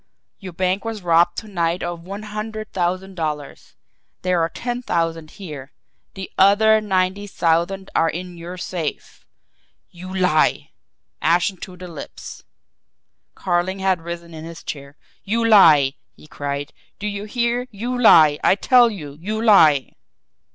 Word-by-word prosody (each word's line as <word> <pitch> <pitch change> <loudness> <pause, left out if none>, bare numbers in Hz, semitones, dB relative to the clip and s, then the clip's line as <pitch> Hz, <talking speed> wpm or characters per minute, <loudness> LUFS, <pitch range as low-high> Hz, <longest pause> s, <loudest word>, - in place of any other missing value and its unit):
Your 185 -3 -9
bank 185 +3 -1
was 225 -4 -5
robbed 170 0 +3
to 220 - -5
night 175 -3 -1
of 175 -1 -4
one 195 +4 -8
hundred 215 +1 -6
thousand 185 +1 -2
dollars. 150 -5 -5 0.5
There 180 -2 +1
are 165 - +1
ten 245 +6 -4
thousand 165 -6 -2
here. 150 -8 -9 0.4
THE 190 -1 -7
OTHER 215 +3 +5
NINETY 190 0 -1
THOUSAND 175 +2 0
ARE 165 - +2
IN 180 +2 -6
YOUR 175 +2 -8
SAFE!" 175 -4 -6 0.6
"You 180 +2 -10
lie!" 180 -5 +1 0.5
Ashen 175 +4 +2
to 180 +1 -10
the 180 0 -9
lips, 165 -4 -10 0.9
Carling 180 +1 -1
had 190 -2 0
risen 170 0 -7
in 160 -1 -8
his 165 0 -10
chair. 140 0 -8 0.3
"You 230 +3 0
lie!" 155 -11 +6 0.2
he - - -17
cried. 145 -1 -5 0.2
"Do 205 - -7
you 205 0 -4
hear! 240 +2 -1
You 235 +5 -4
lie! 160 -11 +6
I - - +5
tell 245 +3 +5
you, 150 -9 -9
you 215 +4 -3
lie!" 160 - +5
180 Hz, 145 wpm, -21 LUFS, 165-205 Hz, 0.9 s, lie